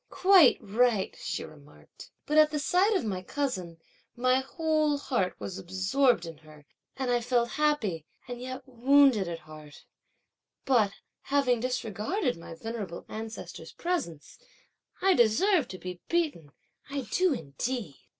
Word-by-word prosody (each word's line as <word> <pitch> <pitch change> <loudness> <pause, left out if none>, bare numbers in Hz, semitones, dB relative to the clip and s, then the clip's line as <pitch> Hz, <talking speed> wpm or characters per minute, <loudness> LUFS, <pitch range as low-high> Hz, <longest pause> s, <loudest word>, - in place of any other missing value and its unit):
"Quite 370 -7 +6
right," 220 -1 +1
she - - -4
remarked. 150 -2 -15 0.2
"But 300 +1 +3
at 305 0 +6
the 305 - -2
sight 365 +8 +2
of 320 - 0
my 190 -4 -2
cousin, 185 - -3 0.4
my 255 +1 +3
whole 310 +1 0
heart 240 -10 -2
was 190 0 -6
absorbed 190 +4 +1
in 165 -2 -8
her, 155 -2 -17 0.3
and 260 -2 -1
I 240 0 +2
felt 240 0 +1
happy, 220 - 0 0.2
and 245 0 -7
yet 255 0 -6
wounded 260 -4 +4
at 170 -1 -4
heart: 155 -2 -14 0.8
but 230 -7 +3 0.3
having 270 -4 +1
disregarded 250 - -2
my 165 0 -10
venerable 210 -2 -6
ancestor's 220 +1 -8
presence, 300 - -4 0.6
I 385 0 +5
deserve 275 - +3
to 185 - -8
be 180 -1 -8
beaten, 300 - -1 0.4
I 280 0 -3
do 370 -1 +3
indeed!" 160 - -4
240 Hz, 140 wpm, -28 LUFS, 185-285 Hz, 0.8 s, Quite